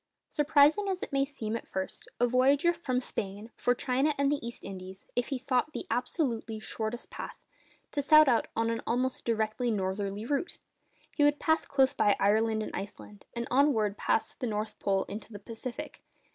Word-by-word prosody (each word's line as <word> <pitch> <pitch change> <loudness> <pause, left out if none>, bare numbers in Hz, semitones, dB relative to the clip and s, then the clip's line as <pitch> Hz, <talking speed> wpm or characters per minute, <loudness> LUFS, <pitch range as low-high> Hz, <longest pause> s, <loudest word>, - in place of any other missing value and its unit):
Surprising 295 +6 +4
as 375 -1 -2
it - - -6
may 275 0 +3
seem 240 -6 -4
at 230 - -5
first 190 0 -5
sight, - - -20
a 245 - +5
voyager 275 +7 +4
from 275 -7 -1
Spain 205 -2 -4
for 245 - +2
China 270 +5 +1
and 280 0 +2
the 290 - -1
East 235 0 -6
Indies 190 0 -8
ought, - - -33
if 245 - +1
he 275 - -2
sought 260 +3 0
the - - -4
absolutely 245 -4 -1
shortest 220 +3 -4
path, - - -6 0.6
to 290 - 0
set 305 +1 +7
out 240 -3 +3
on 225 0 +1
an 230 - -2
almost 255 +2 0
direct 220 -1 0
northerly 200 -2 -1
route! 285 +7 -1 0.6
He 295 - +3
would 290 0 +4
pass 320 0 +2
close 270 -2 +3
by 205 - +3
Ireland 220 +2 +3
and - - -6
Iceland, 205 0 -8
and 235 0 -3
onwards 250 -6 +3
past 225 - 0
the 250 - -1
North 215 0 -3
Pole 195 -1 +1
into 205 +2 -8
the 205 - -7
Pacific. 230 +3 -7
240 Hz, 190 wpm, -30 LUFS, 215-280 Hz, 0.6 s, set